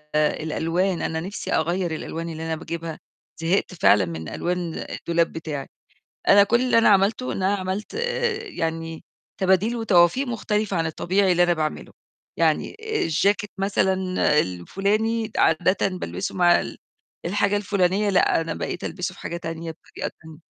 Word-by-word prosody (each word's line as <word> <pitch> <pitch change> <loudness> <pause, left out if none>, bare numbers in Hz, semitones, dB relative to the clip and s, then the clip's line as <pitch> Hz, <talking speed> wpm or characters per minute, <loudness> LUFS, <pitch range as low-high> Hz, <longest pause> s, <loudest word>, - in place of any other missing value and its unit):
الألوان، 165 +4 0
أنا 160 - -1
نِفْسي 190 +5 -5
أغيّر 170 +1 0
الألوان 165 +1 -5
اللي 160 0 -6
أنا 160 0 -1
باجيبها، 165 0 -6 0.4
زهقت 180 +3 +1
فعلًا 105 - +4
من 80 -2 -6
ألوان 175 - -3
الدولاب 170 0 0
بتاعي. 150 -4 -5 0.6
أنا 200 0 +8
كل 235 +4 +2
اللي 255 -2 +3
أنا 230 - +6
عملته 205 +5 +3
إن 190 - -3
أنا 195 +2 +3
عملت 190 - -4
آآ 475 -1 -1
يعني 165 - -4 0.4
تباديل 190 +5 +2
وتوافيق 220 +3 +3
مختلفة 210 -4 -1
عن 165 - +1
الطبيعي 185 +4 +1
اللي 175 0 +4
أنا 175 0 +3
باعمله. 155 -1 -3 0.5
يعني - - +1
الجاكيت 210 - 0
مثلًا 195 -1 +1 0.5
الفُلاني 210 - -1
عادةً 180 +5 +3
بالبسه 190 +1 -4
مع 175 -1 +5
ال - - -7 0.5
الحاجة 200 +3 +1
الفُلانية 200 0 +1
لأ، 185 -3 +3
أنا 165 0 -3
بقيت 175 - -4
ألبسه 180 0 -3
في - - -16
حاجة 170 - -4
تانية 165 -1 -5
بطريقة 160 - -7
تانية. 160 -1 -12
180 Hz, 150 wpm, -24 LUFS, 165-205 Hz, 0.6 s, أنا